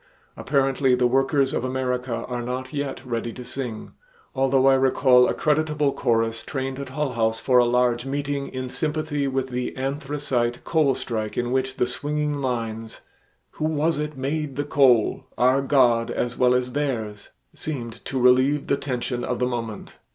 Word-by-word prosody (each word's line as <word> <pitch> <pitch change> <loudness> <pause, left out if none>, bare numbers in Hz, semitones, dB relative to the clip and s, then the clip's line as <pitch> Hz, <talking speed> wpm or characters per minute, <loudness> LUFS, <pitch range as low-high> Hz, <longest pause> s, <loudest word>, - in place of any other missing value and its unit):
Apparently 135 -1 +2
the 125 0 +1
workers 135 +2 +2
of - - -1
America 125 -2 -2
are 125 -1 -3
not 130 +3 -4
yet 140 -2 -4
ready 120 -1 -3
to 125 - -9
sing, 120 -5 -6 0.4
although 135 -1 +2
I 135 - +6
recall 130 -1 +4
a - - -1
creditable 150 -2 +1
chorus 115 -1 0
trained 135 -1 -4
at 140 -2 -6
Hull 140 +1 -2
House 110 -1 0
for 125 0 +4
a 120 - +5
large 120 0 +2
meeting 140 +1 -2
in 130 0 -5
sympathy 150 0 -2
with 135 0 -1
the 125 +1 -3
anthracite 135 -3 -2
coal 155 -5 +2
strike 110 -3 -4
in 120 0 -1
which 130 0 0
the - - +1
swinging 150 +3 -2
lines 115 -3 -3 0.5
"Who 155 - -4
was 155 0 +1
it 150 -1 -4
made 140 +1 -2
the 145 - -1
coal? 130 -6 +3
Our 130 +2 +4
God 125 -4 +3
as 120 0 -2
well 125 0 +3
as 125 0 0
theirs." 115 -8 -3 0.2
seemed 120 -7 -6
to 135 - -2
relieve 130 +3 +4
the 140 - +1
tension 125 -2 -3
of 125 - -2
the 125 - +1
moment. 115 -3 -5
130 Hz, 170 wpm, -24 LUFS, 120-140 Hz, 0.5 s, I